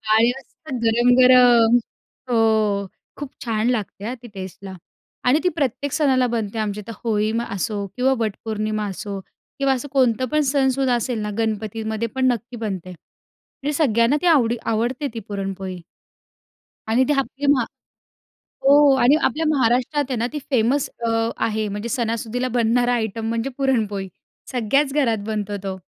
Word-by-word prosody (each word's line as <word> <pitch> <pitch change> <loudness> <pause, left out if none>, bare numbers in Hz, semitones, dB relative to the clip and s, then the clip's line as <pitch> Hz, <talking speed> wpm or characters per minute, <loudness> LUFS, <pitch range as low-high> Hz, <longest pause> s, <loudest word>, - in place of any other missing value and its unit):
आणि 230 +2 +5
मस्त 270 +1 -12
गरम-गरम. 245 0 +6 0.5
हो. 235 - +2 0.8
खूप 290 -2 -6 0.2
छान 225 0 0
लागते 210 -4 -3
अ, 240 - -3
ती - - -9
टेस्टला 190 0 -8 0.5
आणि 285 +5 +5
ती 360 - +3
प्रत्येक 280 -2 -1
सणाला 260 -5 +2
बनते 220 0 -3
आमच्या 210 -1 -2
इथं. 230 - -6
होळीमा 220 +1 0
असो 200 +1 -2
किंवा 265 +2 +3
वटपौर्णिमा 215 -1 -2
असो 195 +1 -5 0.4
किंवा 275 -1 +3
असं 260 +3 -4
कोणतं 255 -3 +2
पण 305 0 +3
सणसूद 270 -1 +1
असेल 240 -1 0
ना 210 - -3
गणपतीमध्ये 220 0 -2
पण 260 0 +1
नक्की 240 +1 -5
बनते 195 -5 -4 0.7
आणि 295 +1 -1
सगळ्यांना 240 -3 +3
ती 360 - -2
आवडी 240 -8 +4 0.2
आवडते 245 +6 -1
ती 225 - -4
पुरणपोळी. 195 -2 -4 1.1
आणि 235 +4 +3
ते - - +4
आपली 275 +1 -4
मा 250 -4 +1 1.0
हो. 285 0 +6
आणि 255 +3 +5
आपल्या 320 +1 +1
महाराष्ट्रात 265 +1 +2
आहे 255 - -1
ना 235 +2 0
ती 300 - -2
फेमस 255 +3 +2 0.2
अ, 230 - +1 0.3
आहे. 215 -1 -1
म्हणजे 205 +3 -4
सणासुदीला 235 0 -2
बनणारा 245 +2 +2
आयटम 225 -1 -2
म्हणजे 230 +3 -1
पुरणपोळी 215 -8 0 0.4
सगळ्याच 270 +4 +1
घरात 260 -7 +2
बनतो 210 -2 -3
तो. 190 -1 -4
235 Hz, 150 wpm, -22 LUFS, 215-265 Hz, 1.1 s, गरम-गरम